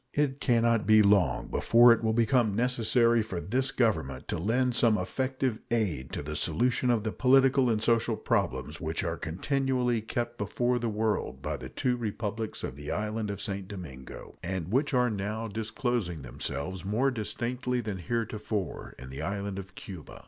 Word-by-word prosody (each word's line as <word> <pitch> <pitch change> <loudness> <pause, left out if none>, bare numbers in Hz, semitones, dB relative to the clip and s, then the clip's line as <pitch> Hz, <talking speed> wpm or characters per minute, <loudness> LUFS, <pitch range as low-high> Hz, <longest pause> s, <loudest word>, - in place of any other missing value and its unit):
It 145 -2 +1
can 120 -3 +3
not 115 -2 +2
be 110 0 +7
long 100 -3 +3
before 120 +1 +6
it 115 - -3
will 110 - +2
become 115 -1 +2
necessary 120 0 +3
for 100 -5 -4
this 125 - -1
Government 80 - 0
to - - -1
lend 125 +7 +1
some 115 -2 +4
effective 130 +4 -1
aid 95 - -1
to - - -3
the 75 +1 -5
solution 120 +11 +1
of 115 -3 +2
the 110 - -1
political 135 0 +4
and 110 -1 +1
social 115 0 +2
problems 65 +4 -1
which 80 +3 -2
are 85 -2 -1
continually 125 - 0
kept 120 +2 -3
before 120 +4 0
the 120 -1 -1
world 105 - -1
by - - -2
the 65 - -8
two 125 - 0
Republics 110 -1 -4
of 65 - -4
the 75 +1 -8
island 105 0 -2
of 100 -1 -4
St. 100 -2 -4
Domingo, 80 -10 -9
and 90 -2 -3
which 135 +5 +2
are 125 -1 +3
now 105 +2 -3
disclosing 110 - -2
themselves 70 +8 -4
more 115 +8 +1
distinctly 125 +2 -2
than 105 -5 -4
heretofore 105 0 -3
in 65 0 -10
the 70 +3 -6
island 100 +2 -3
of 95 0 -10
Cuba. 90 -6 -9
110 Hz, 175 wpm, -29 LUFS, 95-120 Hz, -, be